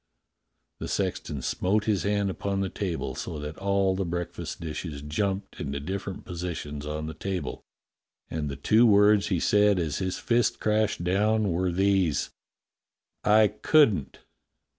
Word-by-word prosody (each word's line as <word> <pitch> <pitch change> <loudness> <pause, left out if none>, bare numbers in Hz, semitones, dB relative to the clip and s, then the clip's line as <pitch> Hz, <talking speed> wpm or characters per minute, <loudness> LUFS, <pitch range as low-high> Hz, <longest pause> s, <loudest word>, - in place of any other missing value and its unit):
The - - -4
sexton 70 -3 -2
smote 105 +3 +1
his 105 -3 +1
hand 100 -1 0
upon 100 +1 -2
the 95 - -1
table 90 -10 -3
so 80 - -5
that 75 +1 -6
all 100 -1 +1
the 95 - -1
break 85 0 -3
fast - - -6
dishes 75 -2 -5
jumped 95 +5 -2
into 70 -1 -3
different 95 +5 -5
positions 85 -5 -5
on 75 +1 -3
the 80 - -5
table, 95 -2 -4 0.7
and 75 -2 -3
the 70 - -4
two 110 +11 +4
words 105 -1 +5
he 90 -4 0
said 105 +1 +4
as 80 -4 -1
his 95 -1 -2
fist 120 -1 +1
crashed 105 -4 +1
down 105 +3 +2
were 90 +2 0
these: 95 -5 +1 0.9
"I 105 0 +5
couldn't!" 105 - +3
95 Hz, 150 wpm, -27 LUFS, 80-105 Hz, 0.9 s, words